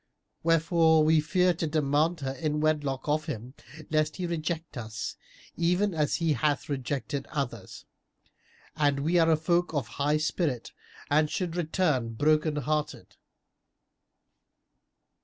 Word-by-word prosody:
Wherefore 165 -1 +4
we 155 +1 +4
fear 180 +3 +2
to 165 -1 -2
demand 155 +2 +1
her 135 -1 -2
in 150 +2 -2
wedlock 145 -4 0
of 155 +1 +1
him, 125 -4 -6 0.4
lest 155 0 +1
he 180 - -3
reject 165 -1 -3
us, 110 -3 -5 0.4
even 180 +4 +1
as 150 -2 +1
he 165 -2 +1
hath 145 +3 0
rejected 140 0 -3
others; 120 -9 -5 0.9
and 145 -2 +1
we 170 +4 +2
are 165 0 +4
a 160 - +4
folk 170 +1 0
of 140 -5 0 0.2
high 150 +2 +3
spirit 155 -5 -1 0.4
and 150 +1 +3
should 175 -1 -3
return 155 -9 0
broken 155 +3 +2
hearted." 150 +1 -3
155 Hz, 130 wpm, -28 LUFS, 145-165 Hz, 0.9 s, Wherefore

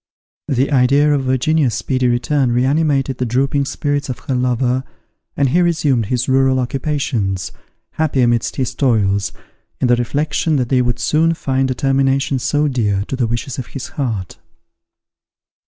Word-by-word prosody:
The 135 +2 0
idea 140 +3 +4
of 135 -2 0
Virginia's 130 -1 +1
speedy 130 -2 0
return 120 +2 +1
reanimated 135 +1 +1
the 125 - 0
drooping 140 +4 +1
spirits 145 0 -2
of 125 - -3
her 135 - 0
lover, 125 0 0 0.5
and 140 -2 +2
he 175 +7 +3
resumed 150 - +1
his 125 +1 -1
rural 130 0 +3
occupations, 120 - -2 0.4
happy 155 -4 0
amidst 120 -2 +1
his 130 -3 -2
toils, 100 -7 +1 0.5
in - - +1
the 120 - +5
reflection 150 +6 -1
that 125 -4 0
they 130 -2 +3
would 120 -1 0
soon 165 +2 +1
find 135 -3 -1
a 130 - -1
termination 135 0 +1
so 150 +4 +1
dear 105 -7 0
to - - -2
the 125 -3 0
wishes 120 +4 -4
of 125 - -5
his 135 - -7
heart. 110 - -4
130 Hz, 155 wpm, -18 LUFS, 120-140 Hz, 0.5 s, the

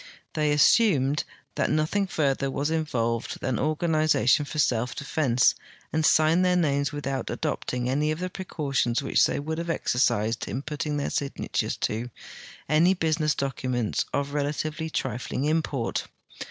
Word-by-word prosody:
They 150 -1 +1
assumed 150 - +4 0.3
that - - 0
nothing 160 +6 +1
further 140 -5 0
was 145 +3 -1
involved 115 -8 -1
than 130 -3 -1
organization 155 -3 +2
for 155 - -7
self 125 -4 +1
defense, 140 -4 +2 0.4
and 160 0 +1
signed 155 +3 +4
their 180 0 +3
names 140 -5 +1
without 135 -4 -3
adopting 125 -1 -2
any 145 +4 +1
of 155 - -1
the 180 +2 -3
precautions 140 -9 -1
which 135 - +3
they - - -1
would 160 +3 -3
have 170 0 -4
exercised 115 -7 0
in 135 - -4
putting 150 0 -3
their 145 - -2
signatures 140 -1 -2
to 115 +3 -1 0.6
any 165 +6 +4
Imsiness 155 -3 0
documents 130 -4 -1
of 140 0 -1
relativel}'' 150 +2 -2
trifling 130 +1 -2
import. 150 -6 -1
145 Hz, 140 wpm, -26 LUFS, 130-155 Hz, 0.6 s, assumed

